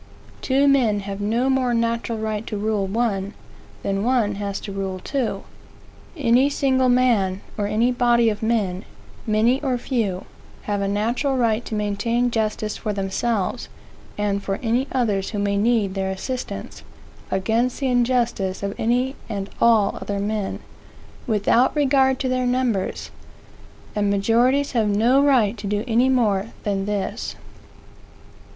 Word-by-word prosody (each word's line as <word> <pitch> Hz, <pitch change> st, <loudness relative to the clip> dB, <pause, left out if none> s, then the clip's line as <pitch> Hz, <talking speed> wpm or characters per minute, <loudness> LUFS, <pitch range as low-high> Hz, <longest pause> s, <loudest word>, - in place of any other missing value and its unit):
Two 275 Hz, +2 st, +2 dB
men 240 Hz, -7 st, +3 dB
have 200 Hz, 0 st, -6 dB
no 230 Hz, +5 st, +1 dB
more 260 Hz, -2 st, +1 dB
natural 230 Hz, 0 st, -1 dB
right 215 Hz, 0 st, -3 dB
to 210 Hz, -, -3 dB
rule 205 Hz, -1 st, -1 dB
one, 200 Hz, -2 st, -1 dB, 0.5 s
than 195 Hz, 0 st, -1 dB
one 235 Hz, -4 st, +2 dB
has 200 Hz, 0 st, -4 dB
to 205 Hz, -, -6 dB
rule 195 Hz, -1 st, -3 dB
two. 255 Hz, +5 st, -3 dB, 0.7 s
Any 260 Hz, 0 st, +3 dB
single 260 Hz, -2 st, +2 dB
man, 225 Hz, -7 st, +2 dB
or 205 Hz, -1 st, -1 dB
any 230 Hz, +4 st, +2 dB
body 240 Hz, -1 st, +3 dB
of 210 Hz, -2 st, -1 dB
men, 210 Hz, -5 st, 0 dB, 0.4 s
many 225 Hz, +5 st, +2 dB
or 260 Hz, -4 st, 0 dB
few, 220 Hz, -7 st, -2 dB, 0.4 s
have 205 Hz, -1 st, -2 dB
a 200 Hz, -, 0 dB
natural 235 Hz, +7 st, 0 dB
right 230 Hz, -2 st, +1 dB
to 220 Hz, -, -4 dB
maintain 220 Hz, +4 st, 0 dB
justice 215 Hz, -1 st, -1 dB
for 210 Hz, -, -3 dB
themselves, 200 Hz, +3 st, -2 dB, 0.5 s
and 205 Hz, -1 st, 0 dB
for 195 Hz, 0 st, -2 dB
any 245 Hz, +4 st, +1 dB
others 210 Hz, -7 st, 0 dB
who 210 Hz, -, -5 dB
may 200 Hz, 0 st, 0 dB
need 210 Hz, -2 st, +2 dB
their 190 Hz, -1 st, -2 dB
assistance 250 Hz, +7 st, -5 dB, 0.5 s
against 225 Hz, +6 st, 0 dB
the 275 Hz, -, -2 dB
injustice 240 Hz, -6 st, 0 dB
of 200 Hz, 0 st, -2 dB
any 250 Hz, +4 st, +1 dB
and 200 Hz, -2 st, -4 dB
all 225 Hz, -4 st, +4 dB
other 200 Hz, -, -3 dB
men, 205 Hz, 0 st, -2 dB, 0.7 s
without 225 Hz, +4 st, +2 dB
regard 265 Hz, -2 st, +3 dB
to 260 Hz, -, 0 dB
their 255 Hz, -1 st, 0 dB
numbers; 245 Hz, -6 st, -1 dB, 0.8 s
and 205 Hz, -1 st, +1 dB
majorities 235 Hz, +8 st, +2 dB
have 225 Hz, -4 st, +1 dB
no 230 Hz, +7 st, +3 dB
right 250 Hz, -7 st, +3 dB
to 205 Hz, -, -5 dB
do 205 Hz, +1 st, -1 dB
any 240 Hz, +3 st, +3 dB
more 215 Hz, -6 st, +2 dB, 0.2 s
than 200 Hz, -2 st, -1 dB
this. 205 Hz, -2 st, -3 dB
225 Hz, 145 wpm, -22 LUFS, 200-250 Hz, 0.8 s, all